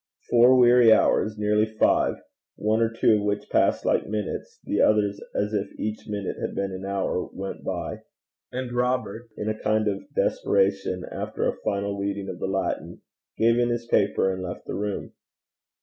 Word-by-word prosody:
Four 120 +2 +7
weary 120 -2 +6
hours, 110 0 +3
nearly 105 +1 +2
five, - - +3 0.4
one 110 +2 +1
or 115 - +3
two 115 -1 +3
of - - -2
which 105 0 -2
passed - - +2
like - - +1
minutes, 105 -1 -4
the - - 0
others 105 -1 +2
as 105 +1 -1
if 100 -1 -2
each 110 0 -4
minute 100 -3 -4
had - - -3
been 100 0 -2
an 95 +1 -6
hour, 100 -2 -2
went 95 0 -6
by, - - -4 0.5
and 130 -1 -4
Robert, 120 -2 -1
in 105 - -4
a 110 - +1
kind 110 0 +1
of 100 -1 -3
desperation, 95 -2 +1
after - - -2
a - - -2
final 100 0 -1
reading 100 0 -3
of 90 - -6
the - - -2
Latin, 95 0 -3 0.3
gave 115 +1 +3
in 120 0 +2
his 120 0 -2
paper, 100 -3 +2
and 95 - -5
left 90 -1 -6
the - - -5
room. 105 -1 -4
105 Hz, 180 wpm, -25 LUFS, 100-115 Hz, 0.5 s, Four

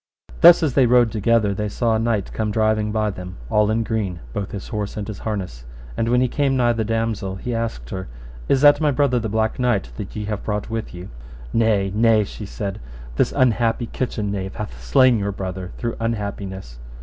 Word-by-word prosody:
Thus 170 0 +8
as 145 -5 +1
they 130 -2 +4
rode 120 -1 +4
together, 110 -1 +2
they 105 +1 -2
saw 115 +2 0
a 110 - +1
knight 115 -3 -1
come 110 -1 -1
driving 110 0 +1
by 105 -1 0
them 90 -1 -8
all 105 0 +3
in 110 +1 +1
green, 105 -6 -2
both 100 -1 -3
his 100 - -7
horse 105 -3 -4
and 105 - -4
his 105 -2 -6
harness; 95 - -4 0.3
and 115 - 0
when 125 +1 +3
he 130 - +3
came 135 +1 0
nigh 120 -1 +3
the 115 -1 -1
damosel, 110 -3 -2
he 120 +5 -4
asked 115 - -4
her, 95 0 -5 0.4
Is 135 - +3
that 145 +1 +6
my 150 - +3
brother 135 -2 +2
the 110 -1 -3
Black 110 +2 0
Knight 110 - 0
that - - -7
ye 105 - -3
have 105 -1 -4
brought 105 +1 -3
with 115 -1 -3
you? 90 +2 -8 0.4
Nay, 105 -4 +2
nay, 110 0 +4
she 105 +1 -8
said, 100 - -5 0.4
this - - +2
unhappy 120 -2 +2
kitchen 110 -3 -3
knave 95 -1 -4
hath 60 - -7
slain 120 - +4
your 100 0 -1
brother 95 -1 -5
through 120 -1 -3
unhappiness. 100 - -4
110 Hz, 210 wpm, -22 LUFS, 100-115 Hz, 0.4 s, Thus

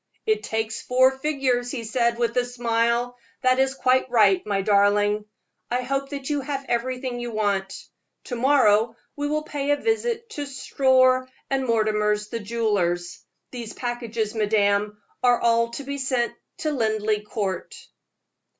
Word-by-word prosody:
"It 435 -1 +1
takes 220 - -3
four 255 +1 +4
figures," 265 -3 -1
he 245 -2 -4
said, 235 +1 0
with 235 0 0
a 250 - +3
smile; 240 0 0 0.3
"that 255 0 +3
is 265 0 +2
quite 260 -1 +2
right, 205 -6 +4
my 200 -2 0
darling. 205 +1 +3 0.4
I 250 +1 0
hope 275 +2 -2
that 280 -2 -6
you 290 -2 0
have 275 0 -4
everything 250 +1 -2
you 240 0 -4
want. 200 -3 -1 0.5
To 245 - -5
morrow 230 -4 +3 0.2
we 290 0 -2
will 305 +1 -1
pay 290 -2 -4
a 290 - +5
visit 455 +3 -1
to 290 -7 -5
Storr 260 -1 +2 0.2
& - - -33
Mortimer's, 215 -5 +1
the 230 - -3
jewelers. 200 -6 -1 0.3
These 235 -3 -7
packages, 235 -3 -3
madame, 210 -1 +1 0.2
are 245 -1 +4
all 230 0 +3
to 280 - -5
be 280 +1 -5
sent 255 -3 0 0.3
to 310 - 0
Linleigh 220 -4 0
Court." 210 - -4
240 Hz, 150 wpm, -24 LUFS, 215-265 Hz, 0.5 s, a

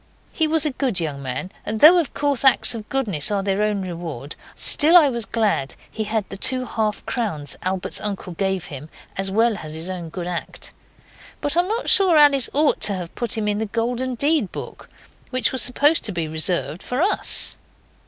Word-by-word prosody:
He 320 - 0
was 315 0 +3
a 300 - 0
good 255 -7 0
young 150 -4 -4
man, 135 +8 -5
and 215 +1 -4
though, 335 +7 +8
of 325 - -3
course, 285 -3 0
acts 265 -2 +5
of 220 -2 -8
goodness 205 - +1
are 200 -2 -1
their 195 +1 -1
own 210 -2 -1
reward, 165 -6 -7 0.2
still 325 +3 +6
I 305 -5 +5
was 235 -4 -1
glad 210 -12 -1 0.2
he 220 - -4
had 215 -1 -2
the 195 - -8
two 255 +5 +1
half 215 -3 -3
crowns 160 - -3
Albert's 185 0 -2
uncle 200 -3 -5
gave 190 0 -2
him, 145 0 -10 0.3
as 195 0 0
well 225 +2 +1
as 155 0 -6
his 165 +4 -4
own 175 -3 -7
good 175 +2 -6
act. 175 -1 -7 0.7
But 290 +2 -1
I - - +3
am 360 - -6
not 450 +4 -3
sure 380 -7 +4
Alice 285 -4 +5
ought 295 +1 +1
to 200 - +4
have 175 -2 -7
put 235 -2 -2
him 215 -1 -2
in 205 0 -1
the 220 - -3
Golden 245 +4 -3
Deed 285 - 0
book - - -9 0.4
which 255 -1 0
was 260 - 0
supposed 290 +6 +3
to 210 - +1
be 170 -4 -3
reserved 160 0 -1
for 250 - -4
Us. 405 - 0
215 Hz, 205 wpm, -21 LUFS, 180-265 Hz, 0.7 s, though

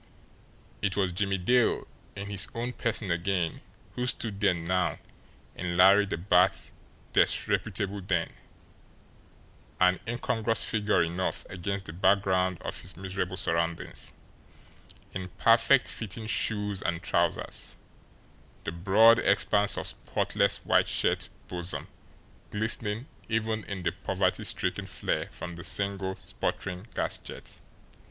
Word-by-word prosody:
It 100 -2 0
was 95 -2 +2
Jimmie 100 +2 0
Dale 120 +6 +2 0.3
in 100 0 -5
his 95 -2 0
own 120 +2 -2
person 115 -6 -1
again 85 -1 -1 0.3
who 125 0 -2
stood 110 -5 0
there 100 -4 +3
now 90 +2 0 0.6
in 85 -1 -3
Larry 100 +3 +7
the 95 - -2
Bat's 90 +1 +3 0.4
disreputable 100 -1 +1
den, 90 -3 -1 1.5
an 90 0 +4
incongruous 115 -1 0
figure 105 -4 +2
enough 85 +3 -2
against 95 +1 -3
the 80 - -7
background 95 -1 +2
of - - -3
his - - -8
miserable 95 -1 -3
surroundings, 85 -1 -1 1.0
in 95 -1 -5
perfect 120 +3 +5
fitting 110 0 -5
shoes 105 -2 0
and 85 -1 -2
trousers, - - 0 0.9
the - - -3
broad 105 +7 +6
expanse 100 0 +3
of - - -3
spotless - - 0
white - - +4
shirt - - +1 0.2
bosom 90 0 -5 0.6
glistening 110 +1 0 0.2
even 110 -1 0
in 95 -3 -5
the - - +1
poverty - - -1
stricken - - -2
flare - - -2
from 85 -1 -8
the 85 - -8
single, 100 -1 +1
sputtering 90 +2 -4
gas - - -1
jet. - - -10
95 Hz, 120 wpm, -29 LUFS, 90-105 Hz, 1.5 s, Larry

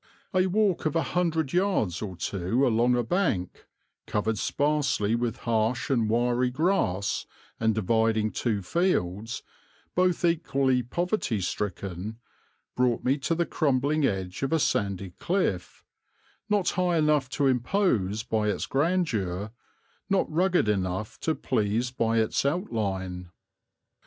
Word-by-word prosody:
A 185 0 +3
walk 195 -4 +1
of 155 - -3
a 165 - +2
hundred 160 -2 0
yards 180 - +1
or 100 -4 -5
two 100 +9 0
along 120 0 +3
a 120 - +1
bank, 115 - -1 0.4
covered 105 0 -1
sparsely 145 -7 +1
with 120 0 -1
harsh 115 +3 0
and 115 -5 +2
wiry 120 +2 +2
grass, 125 - 0 0.3
and 110 -1 +2
dividing 110 +1 +1
two 105 -5 -1
fields, 115 - -1 0.5
both 180 0 +2
equally 140 -6 +2
poverty 150 - -1
stricken, 95 +2 -4 0.6
brought 125 -2 +1
me 135 +3 +1
to 165 +5 0
the 170 +1 +1
crumbling 145 0 +1
edge 95 -7 -1
of 135 - -1
a 165 - +4
sandy 100 - -1
cliff, 170 - -1 0.7
not 205 -3 +2
high 180 -2 +1
enough 150 -4 +2
to 140 +2 0
impose 125 - +1
by 110 -2 0
its - - -1
grandeur, 115 - 0 0.6
not 195 -1 +2
rugged 180 - +2
enough 95 0 -1
to 160 - 0
please 110 +4 0
by 115 -2 0
its 110 -1 +1
outline. 100 - -2
120 Hz, 130 wpm, -27 LUFS, 105-160 Hz, 0.7 s, a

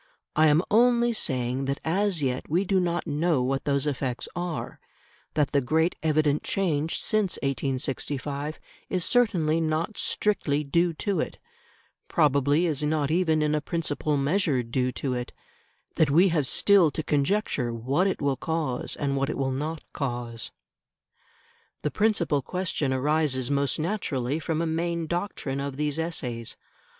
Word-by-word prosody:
I 155 +1 +5
am 155 +3 +4
only 240 +1 +4
saying 130 - -1
that 140 +1 -2
as 185 -1 +1
yet 130 -1 -2
we 175 +6 +2
do 190 0 +2
not 175 -1 -1
know 155 -3 +1
what 135 +1 -1
those 140 -1 +1
effects 130 -4 -2
are; 175 -2 -4 0.6
that 150 -2 +2
the 140 - +3
great 160 +6 +1
evident 155 -2 +2
change 165 -5 0
since 215 -4 +1
1865 140 +2 -2 0.3
is 185 -3 0
certainly 175 -10 +2
not 160 +6 -1
strictly 150 -8 +1
due 170 +4 +2
to 200 +4 -1
it; - - -3 0.7
probably 145 0 +3
is 155 -5 0
not 150 -1 0
even 160 -3 +2
in 150 0 +1
a 150 - +1
principal 150 -2 -1
measure 145 -2 +1
due 125 +2 -1
to 135 -2 -2
it; 125 -1 -4 0.6
that 155 - +4
we 175 +7 +5
have 155 -5 +1
still 195 -1 +4
to 155 +2 -4
conjecture 145 - 0
what 130 +11 0
it 195 - -1
will 140 -2 +1
cause 155 -4 -2
and 140 -1 -1
what 135 0 0
it - - -3
will 135 -1 0
not 150 +4 -3
cause. 120 -4 -4 1.3
The 150 - 0
principal 175 -7 +1
question 165 -2 -2
arises 140 -1 +1
most 140 -1 +1
naturally 155 - -1
from 160 +1 -1
a - - 0
main 165 +1 -1
doctrine 170 -5 -3
of 140 -1 -4
these 150 +1 -1
essays. 125 -9 -3
150 Hz, 155 wpm, -26 LUFS, 135-170 Hz, 1.3 s, I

